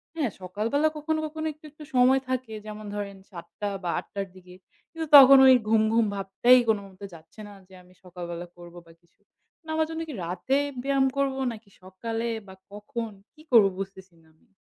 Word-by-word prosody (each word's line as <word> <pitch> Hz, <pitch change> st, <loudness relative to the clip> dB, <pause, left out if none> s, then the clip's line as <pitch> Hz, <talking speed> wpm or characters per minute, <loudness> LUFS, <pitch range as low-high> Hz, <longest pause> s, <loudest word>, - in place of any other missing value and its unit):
হ্যাঁ, 290 Hz, -9 st, -1 dB
সকালবেলা 220 Hz, -, 0 dB
কখনো 315 Hz, +1 st, -2 dB
কখনো 315 Hz, +1 st, -6 dB
একটু, 305 Hz, -, -37 dB
একটু 300 Hz, +1 st, -13 dB
সময় 255 Hz, +2 st, +4 dB
থাকে, 255 Hz, -3 st, -3 dB
যেমন 215 Hz, 0 st, -8 dB
ধরেন 200 Hz, -1 st, -5 dB
৭:00 170 Hz, -2 st, -10 dB
টা 205 Hz, -, -1 dB
বা 175 Hz, -, -2 dB
৮:00 -, -, -11 dB
টার 200 Hz, -1 st, -4 dB
দিকে। 180 Hz, -1 st, -15 dB, 0.4 s
কিন্তু 325 Hz, -1 st, -5 dB
তখন 275 Hz, 0 st, +9 dB
ওই 260 Hz, -, +8 dB
ঘুম, 220 Hz, 0 st, +3 dB
ঘুম 230 Hz, 0 st, +3 dB
ভাবটাই 200 Hz, +6 st, +4 dB
কোনোমতে 200 Hz, -2 st, -3 dB
যাচ্ছে 165 Hz, +5 st, -16 dB
না 205 Hz, -, -12 dB
যে 190 Hz, -, -20 dB
আমি 180 Hz, 0 st, -22 dB
সকালবেলা 175 Hz, -1 st, -7 dB
করবো 175 Hz, 0 st, -13 dB
বা -, -, -16 dB
কিছু। 170 Hz, -, -36 dB, 0.4 s
না -, -, -13 dB
আমার 315 Hz, 0 st, +1 dB
জন্য 325 Hz, 0 st, -5 dB
কী -, -, -6 dB
রাতে 180 Hz, +10 st, -1 dB, 0.3 s
ব্যায়াম 275 Hz, 0 st, +2 dB
করবো 270 Hz, -1 st, 0 dB
নাকি 220 Hz, -2 st, -12 dB
সকালে 225 Hz, +5 st, -5 dB, 0.2 s
বা 190 Hz, -, -12 dB, 0.2 s
কখন, 225 Hz, +2 st, -6 dB, 0.2 s
কী 310 Hz, -, -19 dB
করব 230 Hz, -4 st, +7 dB
বুঝতেছি 190 Hz, -1 st, -8 dB
না 160 Hz, -, -26 dB
আমি। -, -, -33 dB
215 Hz, 195 wpm, -26 LUFS, 190-270 Hz, 0.4 s, তখন